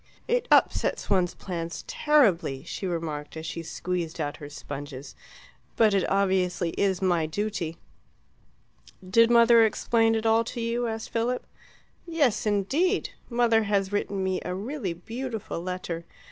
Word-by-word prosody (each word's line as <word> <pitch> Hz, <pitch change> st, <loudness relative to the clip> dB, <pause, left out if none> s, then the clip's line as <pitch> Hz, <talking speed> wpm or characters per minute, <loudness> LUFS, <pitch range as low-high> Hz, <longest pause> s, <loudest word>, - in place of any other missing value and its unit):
"It -, -, +1 dB
upsets -, -, +2 dB
one's 185 Hz, -3 st, +2 dB
plans 170 Hz, -3 st, -5 dB
terribly," 190 Hz, -, +2 dB
she 190 Hz, +3 st, -5 dB
remarked, 160 Hz, -3 st, -4 dB
as 160 Hz, -, -6 dB
she 165 Hz, +1 st, -4 dB
squeezed 170 Hz, 0 st, -4 dB
out 145 Hz, -2 st, -2 dB
her 145 Hz, -3 st, -9 dB
sponges, 145 Hz, -1 st, -8 dB, 0.6 s
"but 220 Hz, -3 st, +4 dB, 0.2 s
obviously 185 Hz, -3 st, +1 dB
it -, -, -8 dB
is 190 Hz, -1 st, 0 dB
my 175 Hz, -4 st, +2 dB
duty." 175 Hz, -2 st, -3 dB, 1.3 s
"Did 230 Hz, +5 st, +5 dB
mother 235 Hz, -1 st, +7 dB
explain 225 Hz, +1 st, +2 dB
it 220 Hz, 0 st, -2 dB
all 225 Hz, +1 st, +4 dB
to 240 Hz, -, -6 dB
you?" 235 Hz, +1 st, -1 dB
asked 225 Hz, 0 st, -5 dB
Philip. 240 Hz, +2 st, -1 dB, 0.6 s
"Yes, 285 Hz, -11 st, +1 dB
indeed! 270 Hz, -, +1 dB, 0.2 s
Mother 235 Hz, -2 st, +3 dB
has 200 Hz, -1 st, 0 dB
written 200 Hz, -1 st, -1 dB
me 190 Hz, -1 st, -1 dB
a 180 Hz, -, -3 dB
really 215 Hz, -, -3 dB
beautiful 225 Hz, +1 st, -5 dB
letter. 180 Hz, -2 st, -4 dB
195 Hz, 140 wpm, -26 LUFS, 170-230 Hz, 1.3 s, mother